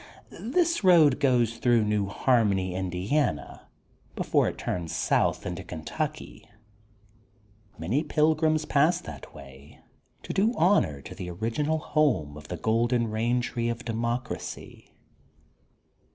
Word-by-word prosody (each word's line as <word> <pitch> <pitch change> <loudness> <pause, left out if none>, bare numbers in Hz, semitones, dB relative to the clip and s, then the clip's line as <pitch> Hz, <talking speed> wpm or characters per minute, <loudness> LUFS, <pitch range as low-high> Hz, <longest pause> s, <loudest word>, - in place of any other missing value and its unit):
This 335 - 0
road 160 -8 +6
goes 120 -5 +2
through 120 -2 +3
New 105 -1 0
Harmony, 100 -5 +1
Indiana, 95 - -2 0.5
before - - +1
it - - -4
turns 85 -3 -4
south - - +1
into - - -5
Kentucky. 140 - -6 1.3
Many 100 - 0
pilgrims 155 0 +2
pass 150 +5 +3
that 70 -4 -10
way 70 +1 -14 0.4
to - - -5
do 220 +5 +2
honor 155 - +2
to - - -9
the 90 - -7
original 115 - -1
home 140 - 0
of 75 0 -11
the 90 - -5
Golden 115 +3 +1
Rain 120 +3 +1
Tree 120 -1 -2
of 120 +1 -5
Democracy. 120 +2 -4
120 Hz, 120 wpm, -27 LUFS, 95-150 Hz, 1.3 s, road